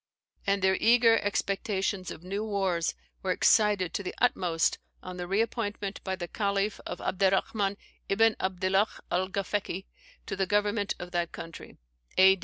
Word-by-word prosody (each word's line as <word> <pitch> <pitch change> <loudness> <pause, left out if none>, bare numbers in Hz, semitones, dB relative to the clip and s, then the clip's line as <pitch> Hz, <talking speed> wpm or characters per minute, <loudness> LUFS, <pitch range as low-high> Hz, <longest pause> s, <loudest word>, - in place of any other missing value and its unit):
And 200 -1 +2
their 190 0 +4
eager 230 -1 +6
expectations 200 -2 -1
of 165 - -8
new 200 +3 -3
wars 190 - 0 0.3
were - - -3
excited 205 -5 +3
to - - -1
the 190 - -5
utmost 175 -9 +1 0.2
on 180 0 -7
the 175 0 -4
re 195 +4 +2
appointment 205 -3 -3
by 190 -1 -2
the 175 -2 -5
Caliph 200 +1 -1
of - - -4
Abderrahman 195 +1 +1 0.3
Ibn 225 +3 +4
Abdillah 190 +2 +2 0.2
Alghafeki 190 +1 -1 0.4
to - - -4
the 195 - 0
government 205 +1 +1
of 175 0 -8
that 175 -1 -1
country, 165 -1 -9 0.4
A. 190 0 +7
195 Hz, 150 wpm, -29 LUFS, 185-205 Hz, 0.4 s, A